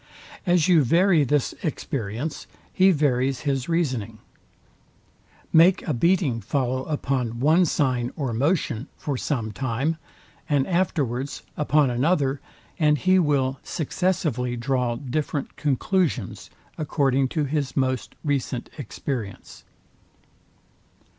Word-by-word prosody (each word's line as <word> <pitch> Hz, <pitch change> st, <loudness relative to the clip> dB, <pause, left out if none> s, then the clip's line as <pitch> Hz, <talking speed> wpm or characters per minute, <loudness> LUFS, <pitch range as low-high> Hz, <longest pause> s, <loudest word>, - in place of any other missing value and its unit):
As 175 Hz, -3 st, +4 dB
you 170 Hz, -5 st, +5 dB
vary 170 Hz, +4 st, +4 dB
this 140 Hz, 0 st, +1 dB
experience, 140 Hz, -, -4 dB, 0.3 s
he 190 Hz, +1 st, +5 dB
varies 135 Hz, -5 st, +1 dB
his 135 Hz, -1 st, -1 dB
reasoning. 135 Hz, -11 st, -1 dB, 1.4 s
Make 175 Hz, +4 st, +5 dB
a 155 Hz, -, +1 dB
beating 145 Hz, -3 st, +2 dB
follow 130 Hz, +3 st, -1 dB
upon 130 Hz, -6 st, -2 dB
one 160 Hz, +7 st, +4 dB
sign 130 Hz, -6 st, 0 dB
or 135 Hz, -6 st, -2 dB
motion 135 Hz, -1 st, 0 dB
for 145 Hz, -5 st, -3 dB
some 125 Hz, -4 st, -2 dB
time, 130 Hz, +7 st, -1 dB, 0.5 s
and 140 Hz, -3 st, +2 dB
afterwards 140 Hz, -8 st, -1 dB
upon 150 Hz, -2 st, +2 dB
another; 140 Hz, +1 st, +1 dB, 0.4 s
and 150 Hz, -2 st, +4 dB
he 185 Hz, +4 st, +3 dB
will 135 Hz, -5 st, +1 dB
successively 150 Hz, -, -1 dB
draw 125 Hz, -1 st, 0 dB
different 140 Hz, +3 st, -3 dB
conclusions, 135 Hz, -, -1 dB, 0.3 s
according 135 Hz, -3 st, +1 dB
to 155 Hz, -, +3 dB
his 140 Hz, -1 st, -2 dB
most 130 Hz, -1 st, -1 dB
recent 135 Hz, -5 st, -2 dB
experience. 120 Hz, -4 st, -6 dB
140 Hz, 110 wpm, -24 LUFS, 125-155 Hz, 1.4 s, you